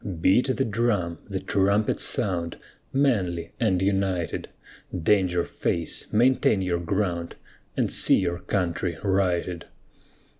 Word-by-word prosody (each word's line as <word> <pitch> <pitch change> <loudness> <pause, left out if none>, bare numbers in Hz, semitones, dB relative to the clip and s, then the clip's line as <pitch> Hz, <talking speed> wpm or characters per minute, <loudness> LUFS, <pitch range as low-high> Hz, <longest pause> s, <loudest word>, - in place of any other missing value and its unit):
Beat 120 +10 +3
the 135 - +1
drum, 100 -7 0
the - - -2
trumpet 100 +2 +1
sound, 85 -4 -1 0.3
Manly 95 -12 0
and 95 -6 +2
united, 95 -3 -1 0.5
Danger 90 -3 +3
face, 85 -1 -2
maintain 115 -3 +3
your 90 -2 0
ground, 85 -2 -2 0.4
And - - +1
see - - +5
your 85 0 -1
country 90 -3 -2
righted. 90 -3 0
95 Hz, 110 wpm, -25 LUFS, 85-105 Hz, 0.5 s, see